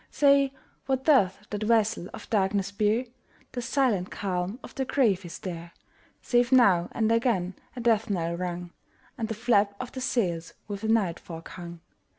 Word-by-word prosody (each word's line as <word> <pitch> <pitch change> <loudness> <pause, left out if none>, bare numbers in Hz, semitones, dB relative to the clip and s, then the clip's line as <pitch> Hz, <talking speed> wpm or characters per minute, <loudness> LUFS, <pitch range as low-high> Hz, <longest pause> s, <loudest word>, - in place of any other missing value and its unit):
Say, 280 -1 +4 0.4
what 265 -1 0
doth 225 - +4
that 205 0 -3
vessel 220 -3 +2
of - - -10
darkness 195 -2 +1
bear? 215 +4 +1 0.5
The 245 - -4
silent 235 -6 +1
calm 185 +1 -3
of - - -10
the 265 - -1
grave 230 -8 +2
is 170 - -7
there, 170 -2 -7 0.5
Save 240 0 +2
now 195 -10 +5
and 220 -1 +1
again 230 -6 +1 0.2
a - - -6
death 230 -1 +2
knell 170 -3 -1
rung, 175 0 -4 0.4
And 225 -3 -3
the 225 - -3
flap 205 -3 +2
of 255 -1 -5
the 260 - -6
sails 180 -11 -1
with 205 0 -6
night 210 -7 +2
fog 165 -1 -9
hung. 170 -2 -9
210 Hz, 165 wpm, -27 LUFS, 180-240 Hz, 0.5 s, now